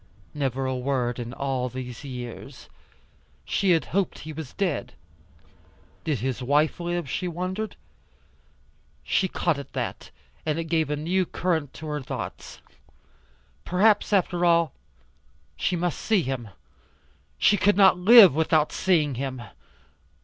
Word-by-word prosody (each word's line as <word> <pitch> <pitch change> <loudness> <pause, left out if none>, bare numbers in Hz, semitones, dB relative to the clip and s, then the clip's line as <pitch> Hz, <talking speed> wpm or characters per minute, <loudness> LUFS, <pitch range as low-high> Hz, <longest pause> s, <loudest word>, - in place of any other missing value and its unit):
Never 135 -2 -2
a 130 0 -1
word 125 -2 -1
in 120 0 -5
all 130 -1 -2
these 125 +1 -7
years. 125 -4 -8 0.8
She 195 - 0
had 165 -3 +3
hoped 195 -1 0
he 155 +1 -8
was 150 -3 -8
dead. 185 -7 -2 1.1
Did 145 -9 -1
his 130 0 -2
wife 145 +6 +2
live, 175 -2 -2
she 180 +7 -3
wondered. 185 +5 -4 1.3
She 190 - +1
caught 170 -4 -1
at 140 - -10
that - - -4 0.3
and 155 -1 -1
it 165 - -1
gave 160 -2 0
a 150 - 0
new 175 +5 0
current 160 -6 -1
to 160 - -9
her 150 -1 -3
thoughts. - - -7 1.0
Perhaps, 205 +5 +3
after 180 -3 +1
all 170 -2 +3 0.8
she 180 - -1
must 175 -1 -2
see 215 -6 +1
him. 130 -5 -4 0.9
She 210 - +4
could 205 0 +2
not 190 -2 +6
live 205 - +9
without 155 0 +2
seeing 160 -7 +1
him. 130 -3 -4
160 Hz, 135 wpm, -25 LUFS, 135-180 Hz, 1.3 s, live